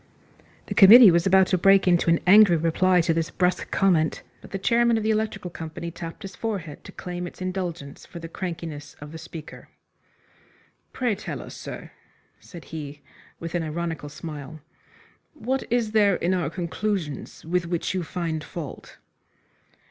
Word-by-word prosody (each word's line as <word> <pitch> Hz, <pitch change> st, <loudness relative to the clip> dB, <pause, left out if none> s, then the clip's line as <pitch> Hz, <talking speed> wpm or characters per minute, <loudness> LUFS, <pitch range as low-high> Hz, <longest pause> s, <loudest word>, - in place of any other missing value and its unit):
The -, -, -4 dB
committee 215 Hz, +1 st, +9 dB
was 170 Hz, +2 st, +2 dB
about 190 Hz, 0 st, +5 dB
to 185 Hz, -, +3 dB
break 195 Hz, +1 st, +5 dB
into 175 Hz, -1 st, +3 dB
an 165 Hz, -, +3 dB
angry 195 Hz, -2 st, +7 dB
reply 175 Hz, +3 st, +3 dB
to 165 Hz, 0 st, +1 dB
this 165 Hz, 0 st, -1 dB
brusque 180 Hz, 0 st, 0 dB
comment, 170 Hz, -5 st, +1 dB, 0.2 s
but -, -, -13 dB
the 195 Hz, -, -4 dB
chairman 235 Hz, +3 st, +2 dB
of 220 Hz, -, -2 dB
the 220 Hz, -, +2 dB
Electrical 215 Hz, -4 st, -2 dB
Company 165 Hz, +1 st, -7 dB
tapped 170 Hz, +4 st, -8 dB
his 195 Hz, -2 st, -8 dB
forehead 185 Hz, -10 st, -5 dB
to -, -, -9 dB
claim 180 Hz, -1 st, -6 dB
its -, -, -12 dB
indulgence 180 Hz, -6 st, -5 dB
for 175 Hz, -, -11 dB
the 165 Hz, -1 st, -7 dB
crankiness 165 Hz, -4 st, -6 dB
of 145 Hz, 0 st, -10 dB
the 160 Hz, -, -8 dB
speaker. 160 Hz, -1 st, -10 dB, 1.2 s
"Pray 245 Hz, -4 st, 0 dB
tell 205 Hz, -, -6 dB
us, -, -, -9 dB
sir," -, -, -8 dB, 0.5 s
said 170 Hz, -3 st, -12 dB
he, 145 Hz, -2 st, -7 dB, 0.4 s
with 165 Hz, 0 st, -6 dB
an 175 Hz, -, 0 dB
ironical 160 Hz, -1 st, -4 dB
smile, 150 Hz, 0 st, -8 dB, 0.8 s
"what 265 Hz, 0 st, -2 dB
is 235 Hz, -3 st, +1 dB
there 205 Hz, -3 st, +4 dB
in 175 Hz, +2 st, 0 dB
our 175 Hz, -5 st, -1 dB
conclusions 170 Hz, -4 st, -4 dB
with 175 Hz, +1 st, -1 dB
which 170 Hz, +1 st, -2 dB
you 185 Hz, -, -1 dB
find 165 Hz, -2 st, -3 dB
fault?" 155 Hz, -2 st, -8 dB
175 Hz, 165 wpm, -25 LUFS, 160-195 Hz, 1.2 s, committee